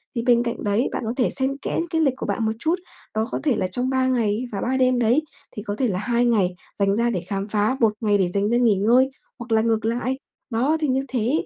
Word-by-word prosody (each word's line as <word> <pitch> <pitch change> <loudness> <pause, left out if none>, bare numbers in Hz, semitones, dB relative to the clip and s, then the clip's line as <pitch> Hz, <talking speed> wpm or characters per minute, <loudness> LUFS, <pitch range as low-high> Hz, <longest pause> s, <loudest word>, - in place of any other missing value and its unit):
Thì 235 - 0
bên 240 -1 +4
cạnh 235 -1 -4
đấy, 210 +5 +1
bạn - - -3
có 225 - -2
thể 250 - +2
xen 270 +1 0
kẽ - - -2
cái 325 -1 +1
lịch 275 -5 +3
của - - -4
bạn 225 - -1
một 220 - +1
chút. 320 +7 +1 0.4
Đó 220 +1 0
có - - -2
thể 285 -6 +2
là 190 -3 0
trong 245 +8 -2
3 260 -1 +1
ngày 230 -4 +1
và 200 - -3
3 260 +2 0
đêm 255 -1 +3
đấy, 240 +5 +3 0.3
thì 210 - -5
có 205 -2 -3
thể 255 +3 0
là 185 -4 -1
2 240 +3 +1
ngày 200 -7 +2 0.2
dành 200 0 +2
ra 235 +2 +1
để 190 -7 -2
khám 195 0 -3
phá, 215 +4 +1
1 225 -3 +3
ngày 205 -2 +3
để 185 -3 +1
dành 200 +1 +1
ra 240 - +2
nghỉ 235 -4 +4
ngơi 240 +7 +4 0.3
hoặc 235 0 -8
là 220 0 +4
ngược 225 -1 0
lại. 245 +3 -1 0.3
Đó, 260 +7 +1
thì 305 - 0
như 265 0 +1
thế, 245 -2 -1
235 Hz, 270 wpm, -23 LUFS, 210-255 Hz, 0.4 s, bên